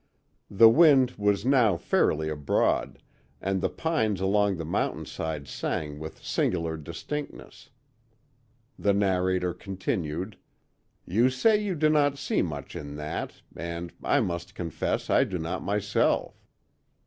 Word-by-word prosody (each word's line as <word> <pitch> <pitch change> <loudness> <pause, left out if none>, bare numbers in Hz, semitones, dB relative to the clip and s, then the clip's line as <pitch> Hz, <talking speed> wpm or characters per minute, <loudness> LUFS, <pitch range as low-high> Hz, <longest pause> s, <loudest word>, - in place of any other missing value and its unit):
The 115 +3 +7
wind 135 -1 +6
was 105 -1 0
now 125 -9 +4
fairly 80 -1 +1
abroad, 75 -2 0 0.4
and 95 0 -1
the - - +1
pines 110 - -1
along 100 0 +2
the 80 - -5
mountainside 80 -2 -3
sang 75 +3 -3
with 80 +1 -9
singular 85 -2 0
distinctness. 135 - -7 1.1
The 100 - +2
narrator 95 -2 +1
continued: 90 0 -4 0.7
"You 115 +8 +3
say 210 - +3
you 195 -3 -1
do 155 0 +3
not 145 -2 +3
see 140 - 0
much 75 -5 -5
in 70 0 -6
that, 75 +1 -5
and 85 0 -5
I - - +3
must 85 0 -4
confess 85 -3 -2
I - - +5
do 95 - -3
not 85 +3 -3
myself. 105 0 0
95 Hz, 125 wpm, -27 LUFS, 80-115 Hz, 1.1 s, The